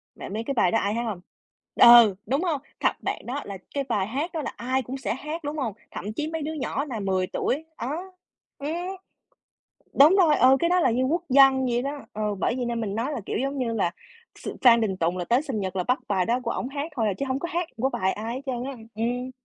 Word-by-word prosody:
Bạn -, -, -8 dB
biết 220 Hz, +2 st, -2 dB
cái 275 Hz, -, -1 dB
bài 185 Hz, -8 st, +3 dB
đó 225 Hz, -, +3 dB
ai 200 Hz, +1 st, -1 dB
hát 235 Hz, +2 st, -1 dB
hông? 210 Hz, -6 st, -4 dB, 0.5 s
Ừ, 235 Hz, -4 st, +8 dB
đúng 275 Hz, +6 st, 0 dB
hông? 320 Hz, -7 st, -1 dB, 0.2 s
Thật, -, -, +3 dB
bạn -, -, -3 dB
đó 265 Hz, +4 st, -3 dB
là 200 Hz, -1 st, -6 dB, 0.2 s
cái 280 Hz, -, 0 dB
bài 200 Hz, -7 st, -1 dB
hát 280 Hz, +10 st, -3 dB
đó 320 Hz, -, -2 dB
là -, -, -5 dB
ai 260 Hz, +2 st, 0 dB
cũng 260 Hz, +2 st, -6 dB
sẽ 265 Hz, -, -2 dB
hát, 305 Hz, +5 st, -6 dB
đúng 295 Hz, +2 st, -4 dB
hông? 245 Hz, -8 st, -2 dB, 0.2 s
Thậm 210 Hz, +3 st, -5 dB
chí 300 Hz, +7 st, -2 dB
mấy 320 Hz, 0 st, -4 dB
đứa 305 Hz, +2 st, -3 dB
nhỏ 280 Hz, -1 st, -2 dB
nà 250 Hz, -7 st, -5 dB
10 190 Hz, -2 st, 0 dB
tuổi, 280 Hz, +9 st, -2 dB, 0.2 s
đó 325 Hz, +10 st, -4 dB, 0.5 s
ừm, 285 Hz, +2 st, -4 dB, 1.3 s
đúng 305 Hz, +7 st, +8 dB
rồi, 330 Hz, -6 st, +5 dB
ừ, 260 Hz, +1 st, +6 dB
cái 340 Hz, -, +2 dB
đó 360 Hz, 0 st, +4 dB
là 260 Hz, -, +3 dB
như 240 Hz, +3 st, +1 dB
quốc 325 Hz, +6 st, 0 dB
dân 265 Hz, -1 st, +6 dB
vậy 240 Hz, 0 st, 0 dB
đó. 280 Hz, +2 st, -4 dB
Ừ, 210 Hz, -1 st, -2 dB
bởi 225 Hz, -, 0 dB
vậy 255 Hz, -, -2 dB
nên 235 Hz, -1 st, -2 dB
mình 205 Hz, -3 st, -3 dB
nói 240 Hz, +7 st, -2 dB
là, 285 Hz, -, -3 dB
kiểu, -, -, -2 dB
giống 275 Hz, +3 st, -2 dB
như 245 Hz, -3 st, -1 dB
là 200 Hz, -6 st, +1 dB, 0.5 s
s -, -, -7 dB
Phan 235 Hz, -2 st, +7 dB
Đình 205 Hz, -4 st, 0 dB
Tùng 170 Hz, 0 st, 0 dB
là 175 Hz, -, -2 dB
tới 240 Hz, +8 st, +2 dB
sinh 265 Hz, -8 st, -3 dB
nhật 190 Hz, -1 st, -4 dB
là 180 Hz, -, +1 dB
bắt 250 Hz, +6 st, +1 dB
bài 190 Hz, -3 st, +1 dB
đó 240 Hz, +2 st, +1 dB
của -, -, -2 dB
ổng 255 Hz, -, -3 dB
hát 290 Hz, +3 st, -5 dB
thôi 225 Hz, -3 st, +1 dB
à, -, -, +1 dB
chứ 275 Hz, -, -2 dB
hổng 260 Hz, +1 st, 0 dB
có 345 Hz, -, -4 dB
hát 345 Hz, -1 st, -1 dB
của 255 Hz, +4 st, +1 dB
bài 190 Hz, -5 st, 0 dB
ai 225 Hz, +2 st, -5 dB
hết 260 Hz, -, -4 dB
trơn 250 Hz, -2 st, -2 dB
á, 275 Hz, -, -4 dB, 0.2 s
ừm. 245 Hz, +3 st, -2 dB
255 Hz, 265 wpm, -25 LUFS, 220-285 Hz, 1.3 s, Ừ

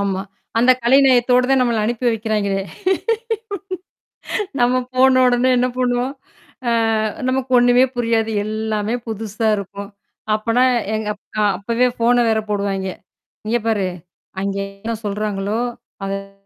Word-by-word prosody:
ஆமா. 195 Hz, -1 st, -1 dB, 0.4 s
அந்தக் 255 Hz, +2 st, +4 dB
கலை 255 Hz, +4 st, +5 dB
நயத்தோட 250 Hz, 0 st, +4 dB
தான் 270 Hz, -1 st, +4 dB
நம்மள 235 Hz, -3 st, +2 dB
அனுப்பி 240 Hz, +2 st, -2 dB
வைக்கிறாங்களே! 210 Hz, -3 st, -1 dB, 2.0 s
நாம 250 Hz, +1 st, +3 dB
போன 255 Hz, 0 st, +5 dB
உடனே 245 Hz, +1 st, +3 dB
என்ன 250 Hz, +1 st, +2 dB
பண்ணுவோம்? 250 Hz, +1 st, 0 dB, 0.5 s
அ -, -, +3 dB, 0.6 s
நமக்கு 255 Hz, 0 st, -1 dB
ஒன்னுமே 245 Hz, +1 st, +5 dB
புரியாது. 230 Hz, -2 st, +1 dB, 0.2 s
எல்லாமே 215 Hz, +1 st, -2 dB
புதுசா 220 Hz, 0 st, -2 dB
இருக்கும். 200 Hz, 0 st, -7 dB, 0.5 s
அப்பன்னா 230 Hz, +3 st, +1 dB, 0.3 s
எங் 215 Hz, -1 st, -3 dB
அப் 205 Hz, -, -21 dB, 0.2 s
அ -, -, +3 dB, 0.2 s
அப்பவே 235 Hz, +5 st, +1 dB
ஃபோன 235 Hz, +1 st, +3 dB
வேற 220 Hz, 0 st, +2 dB
போடுவாங்கே. 195 Hz, -2 st, -1 dB, 0.5 s
இங்க 235 Hz, +2 st, +1 dB
பாரு! 205 Hz, -4 st, +1 dB, 0.5 s
அங்கே 200 Hz, 0 st, -2 dB, 0.2 s
என்ன 230 Hz, 0 st, -1 dB
சொல்றாங்களோ! 205 Hz, +1 st, -2 dB, 0.5 s
அத 195 Hz, 0 st, -6 dB
225 Hz, 125 wpm, -20 LUFS, 200-245 Hz, 2.0 s, கலை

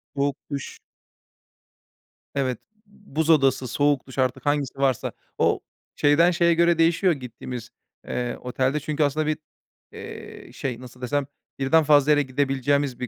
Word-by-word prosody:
Soğuk 140 Hz, -1 st, 0 dB
duş. 140 Hz, -1 st, -5 dB, 1.6 s
Evet. 130 Hz, -4 st, 0 dB, 0.3 s
Buz 165 Hz, -6 st, -4 dB
odası, 135 Hz, -4 st, +4 dB
soğuk 145 Hz, +2 st, +1 dB
duş, 130 Hz, -, -11 dB
artık 130 Hz, +1 st, 0 dB
hangisi 145 Hz, -2 st, 0 dB
varsa. 135 Hz, -3 st, +1 dB, 0.3 s
O -, -, +2 dB, 0.4 s
şeyden 155 Hz, +4 st, +4 dB
şeye 170 Hz, -1 st, +3 dB
göre 170 Hz, 0 st, +3 dB
değişiyor, 170 Hz, +2 st, +3 dB
gittiğimiz, 125 Hz, -3 st, -7 dB, 0.4 s
eee, 120 Hz, -1 st, -2 dB
otelde 130 Hz, +3 st, 0 dB
çünkü 150 Hz, +1 st, -1 dB
aslında 150 Hz, +2 st, 0 dB
bir, 155 Hz, -1 st, 0 dB, 0.5 s
eee, -, -, -10 dB
şey, 125 Hz, -4 st, -4 dB
nasıl 125 Hz, 0 st, -12 dB
desem, 145 Hz, +3 st, 0 dB, 0.3 s
birden 155 Hz, +4 st, +4 dB
fazla 145 Hz, -1 st, +5 dB
yere 145 Hz, -1 st, +5 dB
gidebileceğimiz 135 Hz, 0 st, 0 dB
bir 125 Hz, -, -3 dB
140 Hz, 140 wpm, -24 LUFS, 130-155 Hz, 1.6 s, fazla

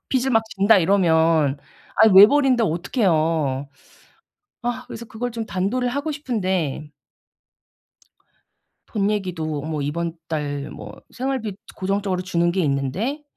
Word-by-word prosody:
빚을 265 Hz, 0 st, 0 dB
막 225 Hz, -2 st, +3 dB
진다 200 Hz, +1 st, +5 dB
이러면 160 Hz, -6 st, +3 dB, 0.4 s
아 220 Hz, -, +7 dB
외벌이인데 250 Hz, +4 st, +7 dB
어떡해요? 160 Hz, -, 0 dB, 1.0 s
아 245 Hz, +1 st, -2 dB
그래서 235 Hz, -, -8 dB
그걸 245 Hz, +2 st, -5 dB
좀 225 Hz, -1 st, -4 dB
단도리를 240 Hz, +7 st, -1 dB
하고 295 Hz, +2 st, -2 dB
싶은데 190 Hz, -, -2 dB, 2.0 s
돈 205 Hz, -1 st, 0 dB
얘기도 165 Hz, -7 st, -3 dB
뭐 155 Hz, -1 st, -3 dB
이번 165 Hz, +3 st, -2 dB
달 145 Hz, -2 st, -3 dB
뭐 105 Hz, -1 st, -9 dB, 0.2 s
생활비 255 Hz, -6 st, -3 dB, 0.2 s
고정적으로 195 Hz, -1 st, -1 dB
주는 175 Hz, -2 st, 0 dB
게 190 Hz, +1 st, 0 dB
있는데 165 Hz, -, -2 dB
190 Hz, 255 characters per minute, -22 LUFS, 155-230 Hz, 2.0 s, 아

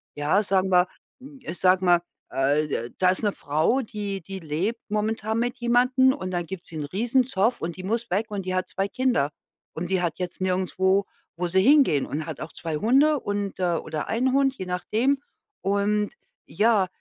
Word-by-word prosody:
Ja, 155 Hz, +8 st, +2 dB
sagen 190 Hz, -1 st, +1 dB
wir 180 Hz, 0 st, +5 dB, 0.3 s
hm, 275 Hz, 0 st, -12 dB
ich 175 Hz, -7 st, -6 dB
sage 185 Hz, 0 st, +4 dB
mal, 175 Hz, -1 st, +5 dB, 0.3 s
äh 145 Hz, +3 st, +1 dB
d -, -, -2 dB
äh, 120 Hz, +1 st, -4 dB
da 185 Hz, -1 st, +4 dB
ist' 190 Hz, -, 0 dB
ne 205 Hz, -, +2 dB
Frau, 155 Hz, -, +1 dB
die 205 Hz, -4 st, -5 dB
die 190 Hz, +3 st, -7 dB
lebt 175 Hz, +9 st, -2 dB
momentan 220 Hz, +1 st, -1 dB
mit 245 Hz, +2 st, -1 dB
jemandem 250 Hz, +2 st, +3 dB
und 185 Hz, -10 st, -5 dB
dann 175 Hz, -1 st, -2 dB
gibt 185 Hz, 0 st, -7 dB
sie 160 Hz, -, -8 dB
'n 150 Hz, -, -3 dB
riesen 235 Hz, -, +1 dB
Zoff 225 Hz, +2 st, +1 dB
und 165 Hz, 0 st, -3 dB
die 185 Hz, -, -7 dB
muss 230 Hz, +4 st, -2 dB
weg 210 Hz, +4 st, +1 dB
und 200 Hz, -3 st, -4 dB
die 185 Hz, 0 st, -1 dB
hat 185 Hz, -, -1 dB
2 195 Hz, +1 st, -1 dB
Kinder. 240 Hz, -, +1 dB, 0.4 s
Und 170 Hz, +2 st, -4 dB
die 190 Hz, -1 st, +1 dB
hat 170 Hz, +1 st, -2 dB
jetzt 180 Hz, -1 st, -4 dB
nirgendswo, 190 Hz, +1 st, +1 dB, 0.3 s
wo 180 Hz, 0 st, -1 dB
sie 190 Hz, +2 st, +3 dB
hingehen 265 Hz, -, +5 dB
und 155 Hz, +1 st, -4 dB
hat 160 Hz, -, -6 dB
auch 155 Hz, -, -7 dB
2 165 Hz, -2 st, -4 dB
Hunde 275 Hz, -, +4 dB
und, 205 Hz, -1 st, -3 dB
äh 175 Hz, -2 st, +1 dB
oder 155 Hz, -1 st, -4 dB
einen 255 Hz, +3 st, +1 dB
Hund, 270 Hz, -1 st, +3 dB
je 185 Hz, -, -5 dB
nachdem. 230 Hz, +10 st, 0 dB, 0.4 s
Und 205 Hz, +1 st, 0 dB, 0.3 s
ja, 210 Hz, -3 st, +2 dB
195 Hz, 205 wpm, -25 LUFS, 175-235 Hz, 0.4 s, wir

